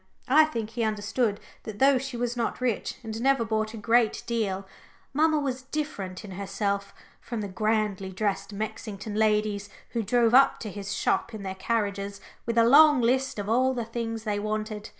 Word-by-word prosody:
I 305 +4 +7
think 230 -8 -4
he 235 0 -2
understood 215 0 0 0.2
that 215 -2 -8
though 270 +1 +5
she 265 -1 -5
was 245 0 -1
not 235 -2 -2
rich, 250 -4 -1
and 225 0 -5
never 270 -2 +3
bought 220 0 -1
a - - -7
great 230 +1 +2
deal, 205 -5 -1 0.5
mamma 310 +2 +3
was 265 -3 -2
different 255 -9 -5
in 200 - -9
herself 200 +1 -2 0.3
from 235 -3 -5
the 205 - -3
grandly 210 -1 -1
dressed 195 0 -2
Mexington 215 0 -5
ladies 210 -1 +1 0.2
who 235 - -1
drove 235 +2 +2
up 270 +2 +6
to 215 - -5
his 195 0 -6
shop 235 - 0
in 210 - -7
their 190 -1 -3
carriages, 200 -1 -2 0.3
with 230 0 -1
a 230 - +6
long 295 +2 +7
list 260 +2 +1
of 205 -1 -4
all 255 +4 +2
the 240 -2 -2
things 225 -1 -4
they 210 -2 -1
wanted. 215 0 -3
220 Hz, 185 wpm, -27 LUFS, 205-245 Hz, 0.5 s, I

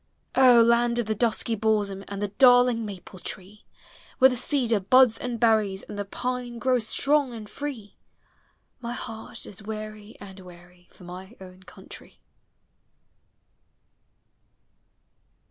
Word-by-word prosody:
Oh, 250 -3 +6
land 235 +1 +2
of 240 - 0
the 215 - -1
dusky 230 +1 0
balsam, 205 -3 -1
And 200 0 -5
the 205 - -2
darling 245 +1 +4
maple 190 -1 -10
tree, 185 +1 -4
THE 200 +3 -17
'HOME. 210 - -26
Where 265 - +6
the - - -2
cedar 240 -3 +1
buds 250 +4 +4
and 245 -2 -4
berries, 215 -4 +2
And - - -10
the 205 0 -4
pine 245 +3 -5
grows 250 -2 0
strong 280 -1 +1
and 215 -2 -9
free! 245 -4 -8 0.8
My 240 -1 -5
heart 225 -1 -8
is 205 - -9
weary 215 0 -8
and 195 -1 -11
weary 180 0 -16
For - - -18
my 185 +5 -10
own 185 -1 -13
country. 190 - -15
220 Hz, 140 wpm, -25 LUFS, 200-245 Hz, 0.8 s, Oh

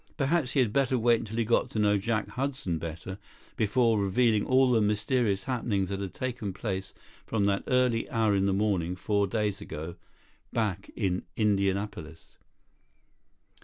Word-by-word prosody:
Perhaps 140 -2 +1
he 140 - +2
had 110 -4 0
better 135 -1 +2
wait 120 0 +3
until 110 0 -6
he 115 - +1
got 115 - +2
to - - -6
know 105 -1 +3
Jack 110 +2 -1
Hudson 130 - -2
better 85 +4 -6 0.4
before 115 +1 +2
revealing 110 +1 +2
all 130 0 +4
the 115 -2 +4
mysterious 105 -1 +1
happenings 110 -7 -1
that 100 0 -3
had 95 -2 -5
taken 125 -6 -3
place 95 -2 -4 0.3
from 105 -3 +1
that 100 -1 +1
early 125 -3 +2
hour 110 -3 +2
in 95 0 +2
the - - +2
morning 95 -3 0
four 100 +2 0
days 105 0 -1
ago, 80 +3 -7 0.5
back 100 -4 -2
in 95 -4 -1
Indianapolis. 100 -5 -1
105 Hz, 160 wpm, -28 LUFS, 95-120 Hz, 0.5 s, all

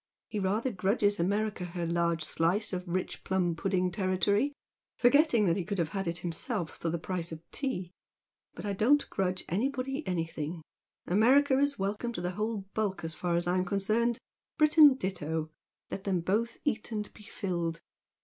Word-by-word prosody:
He 215 - -2
rather 210 +6 0
grudges 205 0 +1
America 200 +2 0
her 175 -1 -4
large 170 -1 +1
slice 175 +7 0
of 180 0 -3
rich 180 +2 -3
plum 180 -3 +1
pudding 185 +1 0
territory, 195 +7 +1 0.5
forgetting 250 -3 +5
that 170 -1 +2
he 190 - -1
could 200 +3 -3
have 165 -3 0
had 195 +1 -3
it 170 0 -1
himself 175 +1 -2
for 165 - -4
the 170 - -1
price 170 0 -3
of 160 0 -8
tea. 220 -11 -2 0.6
But - - -7
I 200 - -1
don't 260 +9 +3
grudge 185 -1 -1
anybody 265 - -1
anything 165 -2 -3 0.4
America 265 +8 +4
is 285 0 +1
welcome 205 +5 -2
to 175 - -4
the 180 0 -1
whole 210 +1 -2
bulk 195 -5 -1
as 165 0 -4
far 175 +1 -1
as 170 - +1
I'm 180 +1 +2
concerned 215 +5 +1 0.4
Britain 305 -2 +7
ditto, 160 - -2 0.4
let 195 - -5
them 185 -3 +1
both 215 +7 0
eat 235 -5 -1
and 210 -1 -4
be - - -15
filled. 170 -6 -3
190 Hz, 170 wpm, -30 LUFS, 175-220 Hz, 0.6 s, Britain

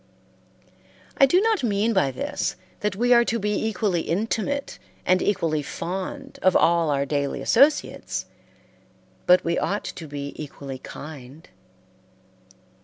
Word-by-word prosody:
I 275 - +8
do 355 +7 +4
not 440 -7 +1
mean 215 0 +1
by 190 -9 +3
this 130 - -3 0.2
that 210 -2 -1
we 245 +4 +3
are 235 0 +6
to 230 - 0
be 210 -1 -1
equally 210 -5 0
intimate 225 +11 -2 0.3
and 185 0 +3
equally 165 -6 0
fond 180 +6 -5
of 185 -1 +4
all 170 -1 +4
our 140 -1 +1
daily 140 0 -1
associates, 285 +5 +2 1.0
but 180 +1 +6
we 170 +1 +1
ought 205 - -1
to 160 - -7
be 140 -1 -6
equally 135 -2 -8
kind. 145 +1 -10
185 Hz, 130 wpm, -24 LUFS, 150-225 Hz, 1.0 s, I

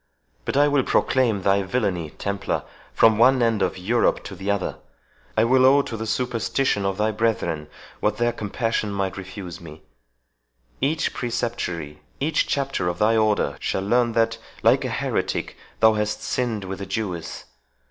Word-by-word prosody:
But - - -1
I 145 +1 +5
will 145 -1 +3
proclaim 120 -5 +1
thy 100 +1 +3
villainy, 95 -6 -1
Templar, 100 +5 -3 0.3
from 110 -1 +4
one 130 +1 +5
end 115 -3 +2
of - - 0
Europe 110 +6 +1
to 95 - -8
the 95 +2 -5
other. 100 -2 -1 0.6
I 110 - +5
will 130 +2 +4
owe 140 +2 +6
to 115 - -6
the 110 0 -4
superstition 120 -2 0
of 95 -1 -2
thy 105 +1 +1
brethren 100 -9 -1 0.3
what 105 0 0
their 120 0 +2
compassion 110 -1 -2
might 95 -1 -2
refuse 95 -2 -8
me, 80 -2 -11 1.0
Each 155 +4 0
Preceptory—each 120 - -2
Chapter 135 -9 -1
of 85 0 -1
thy 110 +3 +3
Order, 110 -1 +1
shall 95 - -1
learn, 120 +3 +2
that, 115 0 +1 0.2
like - - +4
a - - -2
heretic, - - -2 0.3
thou 110 0 +7
hast 105 0 -2
sinned 115 -5 -1
with 95 0 -6
a 100 - -5
Jewess. 90 -7 -4
110 Hz, 160 wpm, -23 LUFS, 95-120 Hz, 1.0 s, thou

